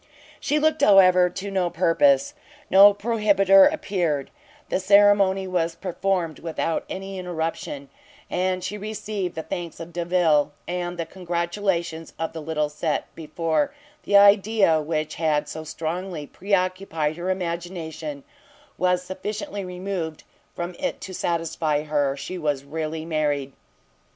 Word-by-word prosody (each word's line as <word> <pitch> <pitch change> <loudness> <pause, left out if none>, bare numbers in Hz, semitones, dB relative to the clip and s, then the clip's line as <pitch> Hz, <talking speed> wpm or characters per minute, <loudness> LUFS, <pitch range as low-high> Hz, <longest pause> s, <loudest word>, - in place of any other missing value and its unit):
She 295 - 0
looked, 315 +1 +2
however, 185 -3 +6
to 195 +3 -6
no 185 -2 +1
purpose; 275 - +3 0.4
no 200 +2 +9
prohibiter 200 -2 +4
appeared, 175 - -2 0.4
the - - 0
ceremony 200 0 +4
was 170 -2 -1
performed 180 -3 -2
without 165 0 -2
any 195 0 -6
interruption, 160 -5 -4 0.4
and 185 0 -1
she 205 +3 -4
received 210 -3 -4
the 160 - -4
thanks 170 +1 -6
of 170 0 -8
Delvile, 170 -4 +2
and 175 0 -3
the 165 - -2
congratulations 170 -1 -2
of 165 - -3
the 160 - -6
little 150 -1 -1
set, 150 +1 -3
before 165 - -1 0.3
the 200 - +4
idea 200 -4 +5
which 155 0 -2
had 150 -2 +1
so 160 +1 -6
strongly 165 +1 -4
pre 195 +7 -10
occupied 185 -5 0
her 175 +2 -3
imagination, 175 - -4 0.6
was 180 0 +2
sufficiently 205 +5 -5
removed 180 -3 -5 0.3
from 175 +1 -4
it - - -2
to 185 - -7
satisfy 160 -3 -1
her 145 -2 0
she 180 +6 -6
was 145 -4 -1
really 155 +2 -4
married. 145 -4 -1
175 Hz, 130 wpm, -24 LUFS, 160-195 Hz, 0.6 s, no